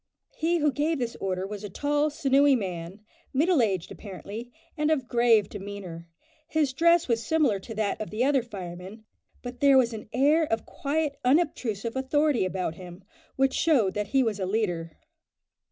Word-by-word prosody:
He 335 +2 +1
who 300 -2 +2
gave 305 +4 0
this 240 -3 -3
order 185 -1 -2
was 205 +1 -7
a 205 - -5
tall, 290 +8 0
sinewy 280 -1 +3
man, 185 -2 -5 0.3
middle 315 +1 +3
aged 190 -6 -1
apparently, 210 +4 -8 0.2
and 300 -1 0
of 275 -6 0
grave 235 -4 +4
demeanour. 195 -5 -8 0.4
His 300 -4 0
dress 335 +3 +4
was 230 -2 0
similar 290 -7 +2
to 225 +3 -9
that 215 0 -1
of 215 - -4
the 215 +3 -1
other 275 -1 +3
firemen, 190 -1 -9 0.4
but 245 0 -7
there 280 -1 +6
was 240 -3 +3
an 215 -1 -8
air 295 +6 +3
of 225 -6 -2
quiet 290 0 -2
unobtrusive 250 - 0
authority 275 -2 +1
about 185 -3 -2
him, 180 +2 -11 0.3
which 265 0 +2
showed 255 - +2
that 210 -1 -2
he 270 +3 +2
was 220 -4 -1
a 190 - -2
leader. 175 -6 -2
235 Hz, 170 wpm, -27 LUFS, 200-285 Hz, 0.4 s, there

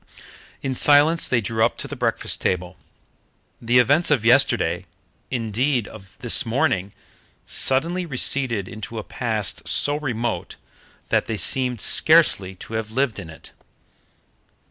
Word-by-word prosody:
In 135 -1 -2
silence 150 +5 +4
they 120 -2 +1
drew 110 +1 -1
up 115 - +1
to - - -3
the - - -7
breakfast - - -1
table. 90 -1 -2 0.9
The 120 +2 +2
events 145 +7 +3
of 130 -7 +1
yesterday 110 -8 +2 0.4
indeed, 120 +1 -1
of 95 -3 -14
this 120 - +3
morning 115 - -1 0.5
suddenly 170 +7 -1
receded 130 - 0
into 110 +2 -8
a 110 - -4
past 110 -6 -2
so 145 0 +3
remote 120 -6 -4 0.5
that - - +1
they 110 - -3
seemed 125 -1 0
scarcely 155 - +3
to 100 - -11
have 110 -1 -3
lived 125 -1 -1
in 85 -5 -9
it. 80 - -13
120 Hz, 135 wpm, -22 LUFS, 105-135 Hz, 0.9 s, silence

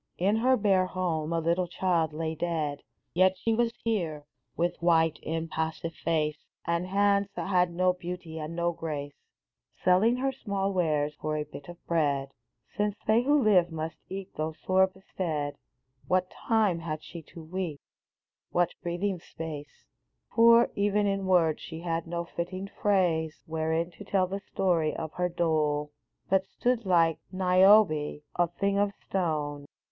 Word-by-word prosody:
In 200 +5 +2
her 255 +3 +3
bare 195 -4 +3
home 170 -4 -2
a 165 - +1
little 170 +2 +1
child 170 -3 0
lay 160 +1 -3
dead; 155 -3 -2 0.3
Yet 185 +2 +4
she 225 +4 0
was 235 +1 +2
here, 170 -10 -1 0.3
with 175 +1 -1
white, 165 -2 +3
impassive 160 0 -3
face, 150 -1 -1 0.3
And 170 +2 0
hands 200 +1 +2
that - - -4
had 180 -2 +3
no 180 +1 +2
beauty 175 -2 -6
and 155 +2 -5
no 170 0 +1
grace, 150 -4 -5 0.7
Selling 190 +6 +4
her 270 +1 0
small 200 -6 -2
wares 150 -5 +1
for 155 0 -1
a 150 - -1
bit 145 -1 -11
of 175 0 -12
bread! 140 -5 0 0.4
Since 205 0 0
they 220 +2 +4
who 285 +2 +3
live 180 -5 +4
must 160 0 -4
eat 195 0 -6
though 155 +1 -2
sore 190 0 +4
bestead, 165 -6 -4 0.5
What 185 0 +1
time 215 -7 +1
had 155 -2 -5
she 170 - -9
to 165 - -9
weep 165 -3 -4 0.4
— - - -66
what 175 -1 +2
breathing 175 +2 -2
space? 155 -4 -8 0.5
Poor 230 0 +6
even 205 +1 +1
in 195 -1 0
words, 170 -4 +3
she 165 -1 -7
had 165 -1 -2
no 170 0 -3
fitting 180 +3 -5
phrase 170 -6 +1
Wherein 160 +2 -1
to 205 - -11
tell 195 -2 +1
the 195 +2 -4
story 170 -5 +1
of 160 -1 -5
her 180 0 0
dole, 155 -3 0 0.4
But 190 0 +2
stood, 240 -4 -1
like 165 -3 +3
Niobe, 185 -5 +4
a 175 0 +3
thing 200 0 +1
of 205 0 +1
stone. 150 -6 -2
175 Hz, 160 wpm, -28 LUFS, 160-195 Hz, 0.7 s, Poor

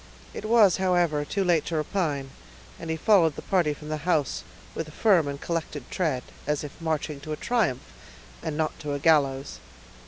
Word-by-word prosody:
It - - -6
was, 215 -5 +5
however, 175 -5 +2
too 195 +6 -1
late 175 -4 +3
to 165 - -2
repine; 150 -4 -1 0.5
and 165 - -7
he 160 - 0
followed 165 -4 +4
the - - -8
party 175 -6 +2
from 150 +1 -8
the 155 - -1
house 150 -2 0 0.3
with 160 - -4
a - - -10
firm 180 -3 +3
and 140 0 -4
collected 155 -5 -4
tread, 155 -9 0 0.2
as 150 0 0
if 150 +2 -9
marching 155 -2 -2
to 155 +2 -5
a - - -4
triumph, 225 - 0 0.6
and 150 - -4
not 155 -1 -1
to 150 -1 -4
a 145 - -2
gallows. 140 - +2
155 Hz, 190 wpm, -26 LUFS, 145-175 Hz, 0.6 s, was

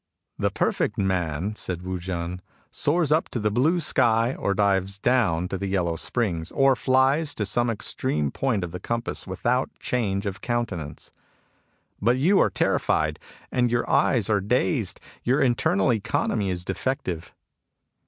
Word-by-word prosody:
*' - - -42
The - - +4
perfect - - -1
man," 95 0 -1
said 90 -4 -4
Wu 95 0 -3
JSn, 90 0 -4 0.2
" - - -34
soars 155 0 +1
up 155 +2 +2
to 120 - -3
the 105 -1 0
blue 155 - +2
sky, 115 -5 +2
or 100 -6 -1
dives 100 -1 +1
down 100 -7 +2
to 95 - -3
the 100 - -2
yellow 90 -4 0
springs,^ 85 -5 -2
or 135 -1 +4
flies 135 +4 +2
to 105 - -1
some 120 +4 +1
extreme 75 -9 -1
point 115 -8 -1
of 85 - -5
the 90 - -6
compass, 115 +3 -3
without 120 +7 0
change 100 -5 -1
of 95 -1 -4
countenance. 100 -11 -3 0.9
But 120 +5 +3
you 180 +9 +4
are - - +4
terrified, - - 0 0.3
and 125 -1 +2
your 120 0 0
eyes 115 -7 +3
are 105 -2 +2
dazed. 100 -1 0 0.2
Your 130 +4 +2
internal 135 +4 +2
economy 105 -1 -1
is 90 -1 -3
defective." 95 -4 -3
105 Hz, 160 wpm, -25 LUFS, 95-125 Hz, 0.9 s, The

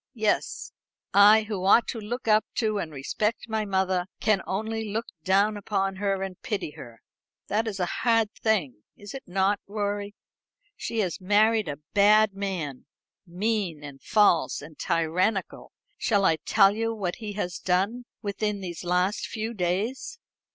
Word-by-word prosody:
Yes; 215 -2 -1 0.4
I, 210 +2 +7
who 205 -3 -4
ought 205 +4 +6
to 230 - -3
look 230 +3 -5
up 215 0 +5
to 215 -3 0
and 160 - -4
respect 210 - -2
my 220 -1 -1
mother, 190 -2 0
can 210 -3 +2
only 220 +2 -3
look 225 +3 -2 0.2
down 200 +4 +3
upon 195 -1 -1
her 195 -1 -1
and 190 -2 -7
pity 205 -8 -3
her. 115 -5 -12 0.5
That 220 +3 0
is 200 -3 -4
a 180 - +1 0.2
hard 225 -3 +3
thing, 180 - -1 0.2
is 205 0 -10
it 270 - -6
not, 195 +2 +1
Rorie? 205 0 -3 0.6
She 225 -1 -2
has 185 -2 -3
married 215 +2 +3
a 145 -1 -4 0.2
bad 210 +1 +5
man 185 -9 -4 0.4
mean, 185 -3 -2
and 140 -2 -10
false 205 -3 +3
and 150 +2 -11
tyrannical. 180 +5 -1 0.3
Shall 200 -3 +2
I 160 - +4
tell 195 +5 +4
you 225 +1 -1
what 185 -5 -3
he 215 -2 -6
has 180 -3 -3
done 200 +7 0 0.2
within 210 0 -2
these 175 -2 -6
last 180 +3 0
few 220 +1 -4
days?" 215 - -2
205 Hz, 160 wpm, -26 LUFS, 185-215 Hz, 0.6 s, I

